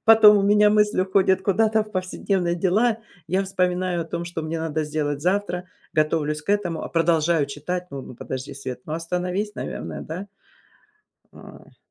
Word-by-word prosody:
Потом 220 -2 +8
у - - +1
меня 210 +1 +5
мысль 210 -2 +3
уходит 190 0 +2
куда-то 220 +2 +2
в 215 - -13
повседневные 185 -1 -1
дела, 215 +6 +2 0.3
я 185 +4 +1
вспоминаю 180 -2 0
о - - -8
том, 170 +1 -4
что 170 -2 -5
мне 160 +1 -3
надо 155 -1 -1
сделать 145 -1 -2
завтра, 185 0 0 0.3
готовлюсь 155 -1 +1
к 200 - -3
этому, 185 -6 0
а - - -5
продолжаю 165 -2 +2
читать. 175 +6 -4
Н 135 -1 -7
ну, - - -9
подожди, 130 +3 -6
Свет, 130 -2 -6
ну, 155 - -6
остановись, 180 +5 -2
наверное, - - -5
да. 180 +6 -6 1.1
Ой. - - -14
180 Hz, 165 wpm, -23 LUFS, 155-200 Hz, 1.1 s, Потом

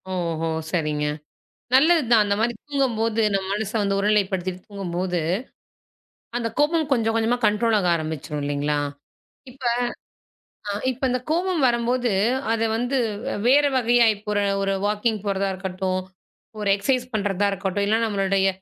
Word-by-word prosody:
ஓஹோ! 165 -2 -2 0.2
சரிங்க. 150 -3 0 0.7
நல்லதுதான். 265 -7 +5
அந்த 200 0 +1
மாரி 235 +2 +2 0.2
தூங்கும்போது, 230 -5 0
நம்ம 190 -1 0
மனசை 210 +1 -3
வந்து 195 0 0
ஒருநிலைப்படுத்திட்டு 190 -3 0
தூங்கும்போது, 180 -3 -2 1.2
அந்தக் 230 -2 -3
கோபம் 310 0 +2
கொஞ்சம் 225 -3 +2
கொஞ்சமா 230 +2 +2
கன்ட்ரோல் 220 +2 +2
ஆக 180 -3 0
ஆரம்பிச்சிடும் 155 -2 -4
இல்லீங்களா? 145 +1 -1 0.7
இப்ப 260 +1 -16 1.1
அ - - 0 0.2
இப்ப 260 +1 -5
அந்தக் 255 0 -2
கோபம் 350 -1 +1
வரம்போது 240 0 +1 0.4
அதை 225 0 +1
வந்து 245 +4 0 0.3
வே - - -2 0.2
வேற 290 +1 +5
வகையா 240 -1 +4
இப்ப 205 +1 -19
ஒரு 205 0 +1 0.2
ஒரு 195 0 0
வாக்கிங் 210 +1 0
போறதா 195 -1 0
இருக்கட்டும், 185 0 -2 0.6
ஒரு 205 -1 -1
எக்சைஸ் 250 +4 0
பண்றதா 205 -1 0
இருக்கட்டும், 195 +1 -1
இல்ல 220 +2 +3
நம்மளுடைய 195 -2 +1
210 Hz, 135 wpm, -23 LUFS, 190-240 Hz, 1.2 s, நல்லதுதான்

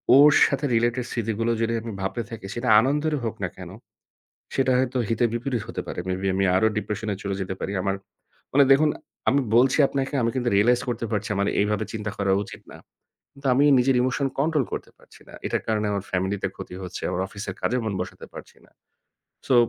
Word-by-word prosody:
ওর 145 +2 +8 0.2
সাথে 140 +1 -1
related 120 +2 +1
স্মৃতিগুলো 115 0 -1
যদি 115 0 +1
আমি 115 - -5
ভাবতে 95 +5 -2
থাকি 115 -4 -8
সেটা 120 0 -1
আনন্দেরই 150 +5 +1
হোক 110 - -2
না - - 0
কেন, - - -8 0.9
সেটা 130 -1 +2
হয়তো 130 0 0
হিতে 115 +1 +2
বিপরীত 120 0 -2
হতে 115 - -4
পারে। - - -5
Maybe 95 +1 -1
আমি 95 0 +2
আরও 110 +4 +4
depression-এ 105 0 -2
চলে 100 -1 -2
যেতে 95 0 -3
পারি। 95 - -3
আমার 95 0 0 0.6
মানে 140 +1 +7
দেখুন 150 +3 +6 0.4
আমি 140 - +3 0.2
বলছি 125 +2 +5
আপনাকে, 135 0 -3
আমি 115 - +2
কিন্তু 125 -2 0
realize 120 +5 +4
করতে 120 -1 -2
পারছি 105 0 -2
আমার 100 +1 +1
এইভাবে 105 +1 +1
চিন্তা 105 -1 -3
করা 100 -1 +1
উচিত - - -11
না। - - -10 0.5
কিন্তু 140 0 -6
আমি 135 +3 +4 0.2
নিজের 130 +1 +3
emotion 130 +2 0
control 150 0 +2
করতে - - -5
পারছি - - -20
না। - - -14
এটার - - -1
কারণে 110 -1 0
আমার 100 -1 -2
family 95 +2 0
তে - - +2
ক্ষতি 95 -1 -8
হচ্ছে, 90 -1 -6
আমার 90 - -1
অফিসের 100 -1 -6
কাজে 125 - +1
মন 110 -3 -2
বসাতে 90 0 -6
পারছি - - -11
না। - - -27 0.8
So 130 - +5
115 Hz, 200 wpm, -24 LUFS, 100-130 Hz, 0.9 s, ওর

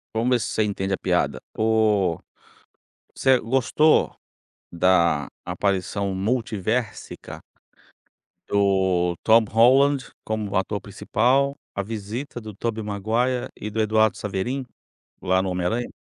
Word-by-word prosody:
Vamos 115 +3 +1
ver 125 - +4
se 110 - -3
você 110 - 0
entende 95 -2 -2
a - - 0
piada, - - 0 0.2
o 110 -6 +2 1.0
você 130 -1 +3
gostou 135 +6 +2 0.6
da 85 -4 +2 0.2
aparição 100 0 -1
multiversica 110 +1 -3 1.1
do 95 -3 +2
Tom 115 0 +6
Holland, 130 +3 +4
como 105 -2 -3
ator 100 +2 0
principal, 125 +8 0 0.2
a 100 - -1
visita 115 +5 -6
do 110 -2 -9
Tobey 110 0 -3
Maguire 110 +5 -1
e 105 - -5
do 110 +1 -1
Eduardo 110 0 +2
Saverin, 105 +7 -3 0.6
lá 95 0 +2
no 95 - -2
Homem 90 -1 -2
Aranha. 115 +6 -1
110 Hz, 120 wpm, -23 LUFS, 95-120 Hz, 1.1 s, Tom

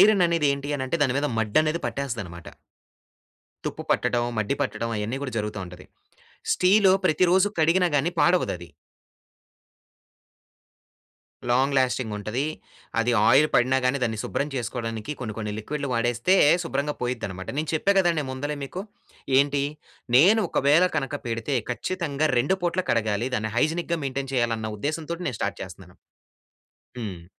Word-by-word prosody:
Iron 205 -3 +6
అనేది 170 -3 +1
ఏంటి 140 0 -5
అనంటే 130 +4 -2
దాని 130 -2 +2
మీద 145 - 0
మడ్డనేది 155 +10 +1
పట్టేస్తదనమాట. 105 -11 -5 1.2
తుప్పు - - -4
పట్టడం, 120 -1 +1
మడ్డి 110 +5 0
పట్టటం 115 -3 -3
అయన్నీ 110 +6 -3
కూడా 130 -4 -4
జరుగుతా 105 0 -3
ఉంటది. 90 +1 -12 0.7
స్టీలు 190 +1 +5
ప్రతిరోజు 185 +5 +4
కడిగినా 175 +3 +3
గాని 155 +5 +1
పాడవదది. 130 - +1 2.8
లాంగ్ 135 +3 +2
లాస్టింగ్ 125 -3 0
ఉంటది. 110 +6 -2 0.6
అది 120 +1 +1 0.2
ఆయిల్ 145 +5 +6
పడిన 130 +2 +4
గాని 135 +2 +2
దాన్ని 110 -2 -1
శుభ్రం 145 - -2
చేసుకోవడానికి 115 +1 -4
కొన్ని 110 -4 -4
కొన్ని 105 -1 -3
లిక్విడ్‌లు 140 +5 -4
వాడేస్తే 120 +9 +2 0.3
శుభ్రంగా 145 -1 -2
పోయిద్దనమాట. 100 -7 -4
నేను 155 0 -1
చెప్పా 195 +6 +2
కదండి 170 -5 +2
ముందలే 145 +3 -3
మీకు. 180 +7 -6 0.6
ఏంటి 140 0 +2 0.5
నేను 195 +11 +6
ఒకవేళ 150 +6 +4
కనుక 145 -1 -2
పెడితే 115 +4 -1
ఖచ్చితంగా 155 +1 -1
రెండు 145 +10 +2
పూట్ల 175 +1 +1
కడగాలి. 110 +1 0
దాన్ని 110 0 -3
హైజినిక్‌గా 170 +3 0
మెయింటైన్ 135 0 -3
చేయాలి 120 -2 +1
అన్న 110 0 -4
ఉద్దేశం 155 +6 -3
తోటి 170 +1 -4
నేను 125 - -5
స్టార్ట్ - - -2
చేస్తన్నాను. - - -11 1.0
హ్మ్. 95 -7 -6
135 Hz, 135 wpm, -25 LUFS, 115-155 Hz, 2.8 s, Iron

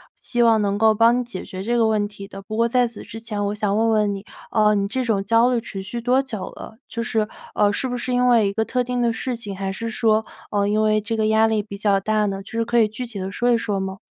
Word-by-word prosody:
希 240 - -2
望 225 -2 +4
能 200 -1 0
够 220 0 +5
帮 230 +3 +4
你 250 - -1
解 220 -6 -7
决 185 - -7
这 235 +4 0
个 225 -1 +3
问 210 -2 +1
题 200 -1 -10
的。 195 -1 -9
不 215 +3 -6
过 230 0 +3
在 250 +1 +3
此 230 - -11
之 225 - -9
前 210 -3 -3
我 205 - -2
想 210 -1 0
问 225 +1 +2
问 210 -2 +2
你， 195 +1 -7 0.3
呃， 210 -1 +4
你 200 -1 +1
这 255 +5 -2
种 210 -4 0
焦 230 +4 +3
虑 235 - 0
持 195 -3 -6
续 235 +5 -5
多 255 +3 +3
久 220 -8 -6
了？ - - -10
就 230 - -4
是， 225 -2 0 0.3
呃， 205 -1 +3
是 260 +5 -2
不 245 - -3
是 250 +1 -3
因 250 0 +3
为 230 -4 +4
一 - - -3
个 220 +1 0
特 250 -1 0
定 245 0 -2
的 235 -1 +2
事 250 +3 -3
情， 210 -4 -6
还 195 0 -3
是 230 +4 -4
说， 220 -1 +2 0.3
呃， 200 -1 +1
因 215 +1 +1
为 215 0 +3
这 225 +2 -3
个 220 -1 +1
压 220 +1 +4
力 220 -1 +1
比 200 -1 -9
较 200 -1 +2
大 215 +1 +1
呢， 195 -1 -3
就 - - -13
是 230 0 -1
可 235 0 +2
以 220 - +5
具 250 +4 -5
体 225 -4 -9
地 190 +1 -4
说 245 +4 0
一 235 - +4
说 205 -3 -2
吗？ 190 0 -4
220 Hz, 320 characters per minute, -22 LUFS, 205-235 Hz, 0.3 s, 够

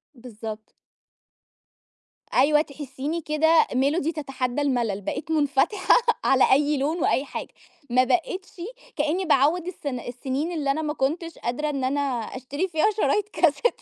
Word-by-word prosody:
بالضبط. 220 -2 -9 1.6
أيوة 300 +2 +5
تحسّيني 290 +2 -5
كده، 315 +2 +3
"ميلودي 285 +5 +1
تتحدّى 270 -3 -3
الملل." 235 -8 0
بقيت 315 +10 -4
منفتحة 300 - +3 0.3
على 265 -1 +4
أي 290 +2 +3
لون 300 +5 0
وأي 275 - +2
حاجة، - - -7 0.4
ما 255 +1 +4
بقيتشِ 365 +4 -2 0.3
كأني 320 +6 0
باعوِّد 315 +4 +3
الس 355 -4 -8
السنين 260 +4 -3
اللي 290 -5 0
أنا 315 +3 -1
ما 300 -1 -2
كنتش 325 +4 -2
قادرة 295 +6 -2
إن 275 -3 -3
أنا 275 +3 0 0.4
أشتري 285 +8 -3
فيها 345 +5 +2
شرايط 420 -1 +1
كاسيت. 345 +6 +1
290 Hz, 135 wpm, -24 LUFS, 265-320 Hz, 1.6 s, أيوة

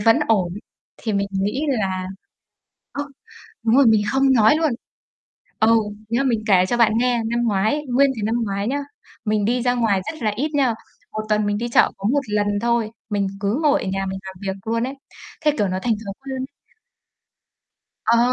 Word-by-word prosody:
vẫn 225 +2 +5
ổn, 185 -6 +2 0.4
thì 220 - -3
mình 200 0 0
nghĩ 205 +8 -1
là 190 -8 -1 0.9
ơ, 285 - -3 0.6
đúng 230 +2 +3
rồi, 280 - +6
mình 220 -2 +5
không 270 0 +4
nói 220 +4 +5
luôn. 320 -1 +1 0.9
Ừ, 225 +1 +5 0.3
nghĩa 230 +1 0
là 275 - +1
mình 235 -5 +1
kể 185 -3 +5
cho 240 - 0
bạn 230 -2 +4
nghe, 245 -1 +2
năm 235 +1 0
ngoái, 220 +8 +1
nguyên 270 +3 +4
cái 220 - -5
năm 220 +2 0
ngoái 200 +1 -2
nhá, 280 +3 0 0.5
mình 210 -2 +1
đi 240 +2 +1
ra 245 0 +2
ngoài 225 -5 +2
rất 315 -5 -11
là 215 -2 +1
ít 295 +6 -1
nha, 265 -5 +2 0.4
1 215 - -3
tuần 210 0 +2
mình 205 0 0
đi 235 +2 -2
chợ 235 - +4
có 195 +1 -2
1 285 - +3
lần 210 0 +1
thôi, 235 -2 +1 0.2
mình 200 -1 0
cứ 210 +8 0
ngồi 295 -1 +3
ở - - -3
nhà 195 0 -2
mình 190 0 -4
làm 190 -1 -8
việc 195 -1 -3
luôn 230 +1 0
ấy, 270 - -5 0.5
thế, 300 -1 +3
kiểu, 205 -2 +2
nó 185 - -2
thành 235 -2 +2
thói 195 - -4
quen. 265 -1 -4 1.6
Ờ. 230 +1 +4
225 Hz, 205 wpm, -21 LUFS, 205-250 Hz, 1.6 s, rồi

